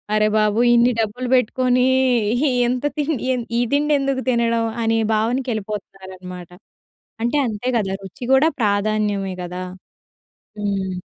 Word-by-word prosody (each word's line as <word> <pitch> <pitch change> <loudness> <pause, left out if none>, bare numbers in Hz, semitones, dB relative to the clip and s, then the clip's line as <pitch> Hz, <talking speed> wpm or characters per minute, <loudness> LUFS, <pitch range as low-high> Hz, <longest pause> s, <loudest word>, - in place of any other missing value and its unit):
"అరె! 215 0 +3
బాబు 215 +1 +2
ఇన్ని 240 +1 +4
డబ్బులు 245 +4 -3
బెట్టుకొని 250 +1 +2 0.8
ఎంత 250 +2 -2
తిండి 295 -4 -1
ఎన్ 240 -2 -4
ఈ - - +3
తిండెందుకు 280 -2 +1
తినడం." 230 -1 +1 0.2
అనే 225 0 +2 0.2
భావనకెళ్ళిపోతున్నారనమాట. 195 -6 -4 0.7
అంటే 240 +5 0
అంతే 215 +3 -5
గదా! 195 -2 -2
రుచి 190 +6 -9
కూడా 295 +5 +5
ప్రాధాన్యమే 205 -2 0
గదా! 180 +1 -6 1.0
హ్మ్. 195 -2 -2
220 Hz, 115 wpm, -20 LUFS, 200-250 Hz, 1.0 s, కూడా